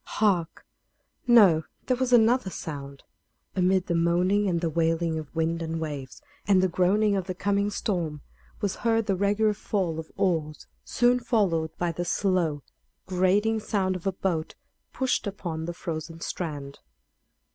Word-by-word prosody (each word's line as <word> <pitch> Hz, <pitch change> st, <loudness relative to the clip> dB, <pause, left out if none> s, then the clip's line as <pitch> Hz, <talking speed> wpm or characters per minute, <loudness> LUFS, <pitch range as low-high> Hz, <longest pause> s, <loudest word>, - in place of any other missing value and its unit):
Hark! 185 Hz, -6 st, +1 dB, 0.6 s
No; 200 Hz, -10 st, +7 dB, 0.2 s
there 255 Hz, -, +2 dB
was 255 Hz, 0 st, -1 dB
another 240 Hz, -2 st, +4 dB
sound. 140 Hz, -5 st, -7 dB, 0.5 s
Amid 185 Hz, 0 st, +2 dB
the 175 Hz, -, -1 dB
moaning 180 Hz, +5 st, +2 dB
and 170 Hz, -2 st, +1 dB
the 165 Hz, -1 st, -1 dB
wailing 165 Hz, 0 st, 0 dB
of 155 Hz, 0 st, -10 dB
winds 165 Hz, +1 st, 0 dB
and 165 Hz, 0 st, -3 dB
waves, 145 Hz, -5 st, -6 dB, 0.2 s
and 195 Hz, -2 st, +5 dB
the 185 Hz, -, +3 dB
groaning 200 Hz, +4 st, +2 dB
of 190 Hz, -2 st, -2 dB
the 185 Hz, -, -3 dB
coming 200 Hz, +2 st, 0 dB
storm, 170 Hz, -8 st, -2 dB, 0.4 s
was 200 Hz, -3 st, -1 dB
heard 225 Hz, -1 st, +1 dB
the 195 Hz, -, +1 dB
regular 205 Hz, +3 st, +2 dB
fall 185 Hz, -5 st, -2 dB
of 160 Hz, -, -8 dB
oars, 160 Hz, -5 st, -1 dB, 0.2 s
soon 245 Hz, +1 st, +2 dB
followed 185 Hz, -10 st, 0 dB
by 175 Hz, -1 st, 0 dB
the 175 Hz, +2 st, -3 dB
slow, 175 Hz, -6 st, 0 dB, 0.4 s
grating 195 Hz, +4 st, +2 dB
sound 190 Hz, -3 st, -1 dB
of 185 Hz, +1 st, -5 dB
a -, -, +2 dB
boat 175 Hz, -4 st, -2 dB, 0.4 s
pushed 260 Hz, -4 st, -1 dB
up 200 Hz, -, -4 dB
upon 160 Hz, -4 st, -4 dB
the 175 Hz, -, -4 dB
frozen 165 Hz, -1 st, -5 dB
strand. 145 Hz, -5 st, -5 dB
180 Hz, 155 wpm, -26 LUFS, 165-205 Hz, 0.6 s, No